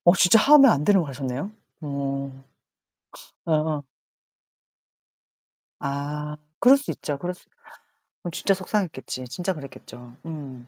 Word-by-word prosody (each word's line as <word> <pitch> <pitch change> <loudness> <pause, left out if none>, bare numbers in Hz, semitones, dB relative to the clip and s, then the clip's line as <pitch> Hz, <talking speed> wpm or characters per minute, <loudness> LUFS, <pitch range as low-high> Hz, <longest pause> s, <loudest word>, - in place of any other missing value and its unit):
어 175 +2 +7
진짜 200 +5 +6
하면 280 0 +8
안 145 - -1
되는 200 +1 +5
거 155 - -6
하셨네요? 135 +6 -4 0.3
어. 140 -2 -4 1.0
어어. 155 -2 0 2.0
아 150 +2 -4 0.2
그럴 265 +3 +7
수 275 - -5
있죠. 145 - -4
그럴 175 +5 -4
수 180 - -21 0.8
어 175 - -3
진짜 195 +4 +1
속상했겠지. 185 -9 -3
진짜 180 +7 -2
그랬겠죠. 125 -5 -12
음 135 -6 -8
150 Hz, 225 characters per minute, -24 LUFS, 140-185 Hz, 2.0 s, 하면